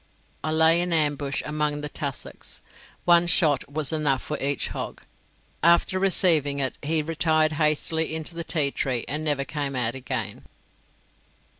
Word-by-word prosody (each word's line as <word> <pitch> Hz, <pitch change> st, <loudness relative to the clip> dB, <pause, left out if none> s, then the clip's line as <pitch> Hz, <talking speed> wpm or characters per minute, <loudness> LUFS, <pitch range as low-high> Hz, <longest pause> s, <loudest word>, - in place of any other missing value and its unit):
I 155 Hz, -, -2 dB
lay 160 Hz, +2 st, +4 dB
in 175 Hz, 0 st, -1 dB
ambush 145 Hz, -3 st, 0 dB
among 150 Hz, -1 st, -1 dB
the 150 Hz, -, -4 dB
tussocks. 140 Hz, -2 st, -6 dB, 0.4 s
One 175 Hz, 0 st, +5 dB
shot 150 Hz, -5 st, +2 dB
was 150 Hz, 0 st, 0 dB
enough 145 Hz, -4 st, +1 dB
for 150 Hz, -, -3 dB
each 140 Hz, 0 st, -1 dB
hog; -, -, -6 dB, 0.6 s
after 170 Hz, +3 st, +3 dB
receiving 165 Hz, -7 st, +2 dB
it 135 Hz, -2 st, -2 dB
he 155 Hz, +1 st, 0 dB
retired 155 Hz, 0 st, +1 dB
hastily 160 Hz, +1 st, +1 dB
into 160 Hz, +1 st, -3 dB
the 170 Hz, 0 st, -4 dB
tea 150 Hz, -4 st, +1 dB
tree 125 Hz, -4 st, -2 dB
and 150 Hz, +4 st, -2 dB
never 145 Hz, -3 st, 0 dB
came 140 Hz, -3 st, -3 dB
out 120 Hz, -2 st, 0 dB
again. 135 Hz, -1 st, -5 dB
150 Hz, 150 wpm, -25 LUFS, 140-160 Hz, 0.6 s, One